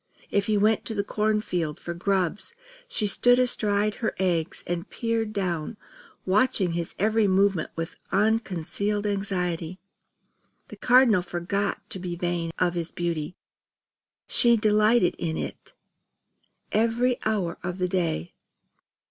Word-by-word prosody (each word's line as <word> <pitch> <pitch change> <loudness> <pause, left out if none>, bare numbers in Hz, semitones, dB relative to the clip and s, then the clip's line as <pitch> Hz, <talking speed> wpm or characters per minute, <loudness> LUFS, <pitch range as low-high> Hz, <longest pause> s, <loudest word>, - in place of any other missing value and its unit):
If 200 -1 +1
he 215 -1 +2
went 215 +1 +2
to 225 - -3
the 200 - 0
corn 210 +1 0
field 170 -7 -3
for 170 - -5
grubs, 190 - -1 0.3
she 240 - 0
stood 245 +4 +5
astride 215 -4 +2
her 225 - -1
eggs 175 -4 -1
and 175 -1 -4
peered 230 -2 -2
down, 185 -1 -3 0.5
watching 200 -1 +2
his 170 0 -4
every 215 +1 +2
movement 195 -3 +2
with 165 0 -5
unconcealed 205 -1 0
anxiety. 185 -4 -2 0.9
The - - -9
Cardinal 245 -6 +5
forgot 185 +4 -3
to 190 - -4
be 175 -1 -4
vain 175 -1 -2
of 180 -1 +1
his 170 -1 -3
beauty; 170 -1 -3 0.9
she 235 -1 +4
delighted 215 -1 +3
in 160 -1 -2
it - - -7 1.0
every 235 +3 +1
hour 200 -6 -1
of 180 0 -4
the 180 -1 0
day. 170 - -2
195 Hz, 130 wpm, -26 LUFS, 175-215 Hz, 1.0 s, stood